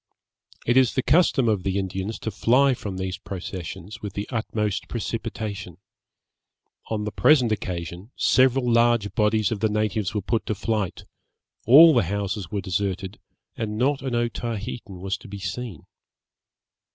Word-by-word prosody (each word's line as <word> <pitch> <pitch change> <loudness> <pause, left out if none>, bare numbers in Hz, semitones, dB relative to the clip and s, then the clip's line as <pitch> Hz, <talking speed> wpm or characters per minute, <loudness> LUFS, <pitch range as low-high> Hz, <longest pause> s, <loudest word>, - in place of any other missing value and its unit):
It 120 +2 +3
is 130 -2 +4
the 130 - +1
custom 140 -4 +3
of 105 -4 +2
the 95 +1 -1
Indians 95 +2 -3
to 110 - -3
fly 130 +6 +3
from 100 -6 -6
these 95 0 -4
processions 95 +2 -7
with 105 -3 -6
the 100 - -4
utmost 110 -3 -2
precipitation. 100 -6 -4 1.1
On 110 -1 -2
the 105 - -3
present 130 -4 +4
occasion 90 -1 -4
several 130 0 +3
large 115 -3 +3
bodies 110 -1 +2
of 110 - -2
the 110 - +1
natives 105 -1 -1
were 105 - -1
put 115 +3 -1
to 110 - -1
flight, 105 -3 -2 0.6
all 155 +7 +9
the - - +4
houses 100 -1 -3
were 100 +1 -2
deserted, 95 +1 -3 0.4
and 105 -1 -3
not 135 +4 +1
an 130 -3 -2
Otaheitan 115 -4 -4
was 95 +1 -2
to - - -13
be 100 0 -7
seen. 100 0 -6
105 Hz, 150 wpm, -24 LUFS, 95-120 Hz, 1.1 s, all